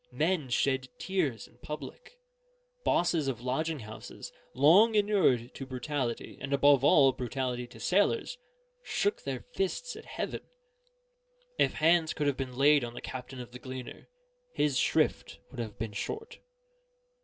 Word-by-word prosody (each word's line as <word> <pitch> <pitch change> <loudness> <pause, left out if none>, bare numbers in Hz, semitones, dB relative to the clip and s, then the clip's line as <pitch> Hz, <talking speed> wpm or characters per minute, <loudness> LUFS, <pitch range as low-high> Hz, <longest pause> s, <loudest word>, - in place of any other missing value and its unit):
Men 160 -5 0
shed 130 +1 +1
tears 155 - -1
in 120 - -25
public; 470 - -8 0.7
bosses 170 -4 +2
of 125 -4 -2
lodging 150 +4 -1
houses, 110 0 -9 0.2
long 185 - +6
inured 190 - +2
to 135 - -7
brutality, 130 -1 -3
and 140 - -3
above 140 -1 +5
all, 140 -2 +6
brutality 125 -1 -3
to - - -14
sailors, 205 - +1 0.4
shook 410 -4 -1
their - - -5
fists 440 +6 -2
at - - -11
heaven: - - -4 1.2
if - - +3
hands 160 0 +3
could 150 - -2
have 145 -2 +2
been 130 -2 -5
laid 145 0 +5
on 120 0 -6
the - - -5
captain 130 0 -7
of 120 -1 -8
the 125 - -9
Gleaner, 130 -1 -8 0.5
his 140 -4 +2
shrift - - +1
would - - -9
have 110 -3 -5
been 110 -1 -4
short. 440 - -5
140 Hz, 145 wpm, -30 LUFS, 125-165 Hz, 1.2 s, long